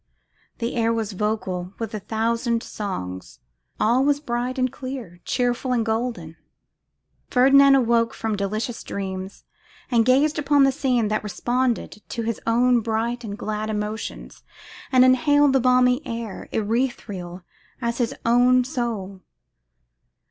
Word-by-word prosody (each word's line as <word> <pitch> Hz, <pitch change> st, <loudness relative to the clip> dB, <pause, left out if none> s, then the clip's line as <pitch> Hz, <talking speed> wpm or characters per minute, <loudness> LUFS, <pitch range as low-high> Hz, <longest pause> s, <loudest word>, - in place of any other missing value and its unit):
The 235 Hz, +1 st, -3 dB
air 230 Hz, 0 st, +2 dB
was 225 Hz, -2 st, -2 dB
vocal 190 Hz, -3 st, -3 dB
with 225 Hz, -2 st, -5 dB
a 215 Hz, -, -3 dB
thousand 230 Hz, +3 st, -1 dB
songs; 95 Hz, -, -6 dB, 0.4 s
all 240 Hz, +4 st, +3 dB
was 285 Hz, 0 st, +2 dB
bright 250 Hz, -1 st, -3 dB
and 255 Hz, -1 st, 0 dB
clear, 255 Hz, -10 st, -7 dB
cheerful 250 Hz, +1 st, 0 dB
and 230 Hz, -2 st, +1 dB
golden. 220 Hz, -8 st, -3 dB, 0.9 s
Ferdinand 275 Hz, +2 st, +6 dB
awoke 235 Hz, -3 st, +2 dB
from 220 Hz, -1 st, -2 dB
delicious 215 Hz, +4 st, -3 dB
dreams, 190 Hz, -1 st, -6 dB, 0.5 s
and 230 Hz, -2 st, +4 dB
gazed 280 Hz, +5 st, +3 dB
upon 285 Hz, -1 st, +4 dB
the 270 Hz, -, +4 dB
scene 255 Hz, -5 st, 0 dB
that 215 Hz, 0 st, 0 dB
responded 240 Hz, +2 st, -1 dB
to 230 Hz, -, -3 dB
his 230 Hz, 0 st, -3 dB
own 245 Hz, +2 st, +4 dB
bright 230 Hz, +2 st, -2 dB
and 205 Hz, -2 st, -6 dB
glad 215 Hz, +1 st, -3 dB
emotions, 210 Hz, +1 st, -5 dB, 0.5 s
and 255 Hz, -1 st, +6 dB
inhaled 290 Hz, +2 st, +4 dB
the 270 Hz, -, +4 dB
balmy 250 Hz, +1 st, +3 dB
air, 230 Hz, -6 st, -6 dB
ethereal 205 Hz, -6 st, -2 dB, 0.4 s
as 235 Hz, -1 st, -2 dB
his 240 Hz, -2 st, 0 dB
own 245 Hz, +2 st, +4 dB
soul. 230 Hz, -8 st, -4 dB
235 Hz, 135 wpm, -23 LUFS, 215-255 Hz, 0.9 s, Ferdinand